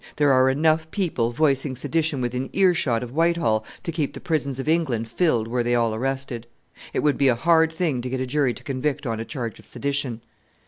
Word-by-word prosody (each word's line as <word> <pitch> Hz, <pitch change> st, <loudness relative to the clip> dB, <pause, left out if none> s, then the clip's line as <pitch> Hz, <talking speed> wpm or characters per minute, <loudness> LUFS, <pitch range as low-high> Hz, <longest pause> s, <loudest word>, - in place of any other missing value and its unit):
there 145 Hz, -2 st, +4 dB
are 130 Hz, 0 st, +5 dB
enough 160 Hz, +3 st, +2 dB
people 160 Hz, -, 0 dB
voicing 135 Hz, +1 st, +1 dB
sedition 155 Hz, +1 st, -1 dB
within 125 Hz, +2 st, -2 dB
earshot 170 Hz, -11 st, +2 dB
of 120 Hz, -, -7 dB
Whitehall 165 Hz, -8 st, +2 dB, 0.2 s
to 170 Hz, -, -2 dB
keep 155 Hz, -3 st, -2 dB
the -, -, -6 dB
prisons 140 Hz, -5 st, -1 dB
of 135 Hz, -, -4 dB
England 145 Hz, -9 st, +1 dB
filled 120 Hz, -6 st, +1 dB
were 120 Hz, +1 st, 0 dB
they 120 Hz, 0 st, +1 dB
all 115 Hz, -2 st, +2 dB
arrested. 130 Hz, -1 st, -3 dB, 0.4 s
It -, -, -1 dB
would 145 Hz, -3 st, +1 dB
be 140 Hz, -, +4 dB
a 125 Hz, -, +4 dB
hard 160 Hz, +5 st, +3 dB
thing 160 Hz, -6 st, -1 dB
to 125 Hz, -, -4 dB
get 130 Hz, +1 st, -2 dB
a 130 Hz, -, -1 dB
jury 130 Hz, -2 st, +1 dB
to -, -, -12 dB
convict 140 Hz, +2 st, -2 dB
on 115 Hz, -3 st, -2 dB
a 115 Hz, -, -4 dB
charge 120 Hz, -6 st, -5 dB
of -, -, -15 dB
sedition." 140 Hz, -5 st, -2 dB
135 Hz, 215 wpm, -24 LUFS, 120-155 Hz, 0.4 s, are